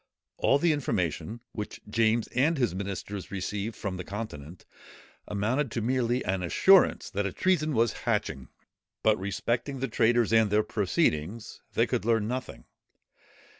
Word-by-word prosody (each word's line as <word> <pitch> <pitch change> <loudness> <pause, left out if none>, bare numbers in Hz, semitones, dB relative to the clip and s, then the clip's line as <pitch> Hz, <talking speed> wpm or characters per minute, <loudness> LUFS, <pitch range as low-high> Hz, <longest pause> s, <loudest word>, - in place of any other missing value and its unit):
All 140 - +3
the 165 +2 +3
information, 110 - -2
which 105 -1 -6
James 115 +1 +2
and 150 +6 +2
his 120 -9 +1
ministers 100 0 -5
received 100 +3 -3
from 95 -2 -4
the 90 - -5
Continent, 90 -6 -7 0.6
amounted 115 +5 -1
merely 125 0 +1
to - - -7
an 95 -1 -2
assurance 185 - +4
that 100 0 -1
a - - -4
treason 155 - +1
was 115 0 +2 0.2
hatching; 65 -2 -1 0.6
but 110 -2 +3
respecting 120 +7 -2
the 135 - -1
traitors 120 -1 +2
and 110 -2 +5
their 105 +1 +3
proceedings 105 - -1
they - - +3
could - - -1
learn 115 -2 +2
nothing. 125 +1 -5
110 Hz, 145 wpm, -28 LUFS, 100-125 Hz, 0.6 s, and